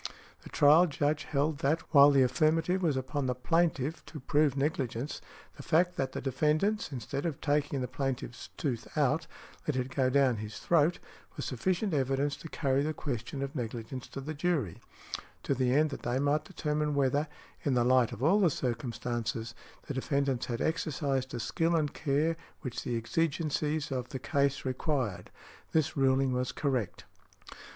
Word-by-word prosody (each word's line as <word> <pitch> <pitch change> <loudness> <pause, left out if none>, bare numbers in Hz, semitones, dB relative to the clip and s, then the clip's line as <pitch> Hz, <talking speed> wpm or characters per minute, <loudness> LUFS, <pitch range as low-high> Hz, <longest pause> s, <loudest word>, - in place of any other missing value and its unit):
The - - -12
trial 155 +5 +6
Judge 145 0 0
held 145 0 0
that 155 +4 +1
while 140 -1 +9
the 140 -2 +5
affirmative 160 +8 +2
was 155 -6 +1
upon 130 +1 -2
the 125 - 0
plaintiff 160 +1 0
to 155 - -8
prove 145 +1 +2
negligence, 135 -2 -2 0.4
the - - -7
fact 175 +2 +2
that 130 -1 -2
the - - -4
defendants, 155 - +1
instead 135 +2 -4
of 160 -5 -2
taking 145 -2 0
the 125 - -2
plaintiff's 130 -3 -4
tooth 125 -6 -2
out, 155 +3 +2 0.4
let 150 - +1
it 130 0 -2
go 130 -2 +3
down 130 -3 +3
his 105 0 -6
throat, 170 0 +3 0.4
was - - -3
sufficient 185 - -1
evidence 135 +1 +1
to 165 - -9
carry 135 -3 +1
the 155 +1 -1
question 135 0 -4
of 135 0 -4
negligence 120 0 -5
to 135 - -7
the 155 +3 -5
jury, 145 - -1 0.6
to - - +1
the 130 -1 +1
end 150 +3 +3
that - - -6
they 120 +1 -1
might 145 +2 +1
determine 150 -3 -1
whether, 140 +2 +2 0.4
in 140 -3 +1
the 120 - +3
light 125 -2 +4
of 115 - -6
all 185 +8 +5
the 185 -4 +5
circumstances, 115 -3 -3 0.3
the - - -4
defendants 135 -1 0
had 120 -1 -3
exercised 140 -5 -1
the 120 - -5
skill 165 +9 +1
and 150 -3 0
care 155 +3 +1 0.3
which 130 -5 -4
the 120 - -1
exigencies 155 +3 -1
of 125 -2 -3
the 135 - -4
case 140 +1 0
required. 130 - -2 0.4
This 155 -3 +2
ruling 135 -1 +3
was 125 0 -1
correct". 130 - -2
140 Hz, 170 wpm, -30 LUFS, 130-155 Hz, 0.6 s, while